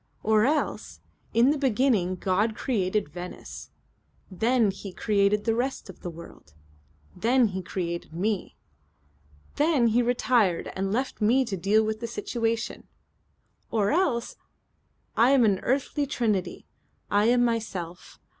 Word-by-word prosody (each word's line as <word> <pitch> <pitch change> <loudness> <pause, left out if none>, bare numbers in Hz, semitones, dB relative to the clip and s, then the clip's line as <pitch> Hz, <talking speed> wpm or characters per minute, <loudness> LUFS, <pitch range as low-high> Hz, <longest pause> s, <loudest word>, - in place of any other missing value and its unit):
Or 215 0 +3
else: 300 +3 -1 0.3
'In 240 +4 +4
the 300 - -1
beginning 235 -8 +2
God 205 +4 0
created 210 - -1
Venice. 180 +1 -8 0.6
Then 225 +3 +2
He 195 0 -9
created 205 0 +1
the 225 - +2
rest 245 -3 -3
of - - -21
the 175 - -6
world. 160 - -13 0.6
Then 240 0 +3
He 190 -1 -4
created 170 -2 -4
Me. 195 +4 -2 1.0
Then 290 -6 +3
He 235 +3 +3
retired 235 -6 +1
and 195 0 -2
left 255 +2 -2
me 250 +5 +3
to 215 -5 -3
deal 200 +4 +2
with 220 0 -2
the 235 - -4
situation.' 230 0 -3 0.8
Or 210 -3 +1
else: 290 -9 0 0.8
'I 230 +3 +5
am 270 -4 +5
an 200 -3 +2
earthly 280 +2 -1
Trinity. 215 -8 -1 0.5
I 205 +1 +3
am 245 +1 +4
myself. 190 -7 -4
220 Hz, 135 wpm, -26 LUFS, 195-245 Hz, 1.0 s, I